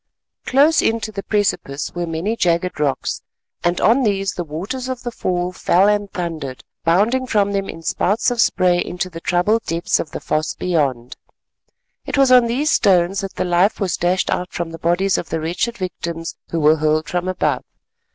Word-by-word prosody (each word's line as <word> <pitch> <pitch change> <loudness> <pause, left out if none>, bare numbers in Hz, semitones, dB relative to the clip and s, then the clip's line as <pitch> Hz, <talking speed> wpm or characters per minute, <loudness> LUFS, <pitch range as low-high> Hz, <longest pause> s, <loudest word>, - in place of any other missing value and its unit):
Close 290 +5 +4
in 225 +1 +1
to 220 - -4
the 200 -1 -5
precipice 190 -9 -1
were 175 -1 -3
many 165 +7 -2
jagged 175 -4 0
rocks, 145 -3 -1 0.4
and 175 0 +1
on 235 +5 +4
these 195 -4 0
the 175 - -3
waters 190 - -5
of 255 -1 -4
the 240 - -3
fall 180 -4 -2
fell 185 +1 +3
and 205 -1 +1
thundered, 160 -7 -5 0.2
bounding 215 +10 +2
from 205 -4 +2
them 195 -1 -2
in 165 - -8
spouts 205 +8 +1
of 240 -2 +1
spray 180 -1 +3
into 180 +1 -4
the 165 0 -8
troubled 185 +7 +2
depths 165 +1 0
of 155 - -3
the - - -6
foss 155 0 -1
beyond. 140 -7 -1 0.9
It - - -3
was 270 -2 +4
on 250 -2 +7
these 275 +7 0
stones 190 0 +3
that 195 -1 -6
the - - -1
life 180 +4 +2
was 195 -5 0
dashed 180 +2 0
out 180 0 -2
from 170 -1 -4
the 165 - -8
bodies 180 +3 +1
of 170 - -7
the 160 - -2
wretched 175 +9 -2
victims 170 -3 -5
who 165 - -1
were 155 +1 +4
hurled 155 +1 +1
from 180 +1 -2
above. 185 - 0
180 Hz, 190 wpm, -20 LUFS, 165-210 Hz, 0.9 s, on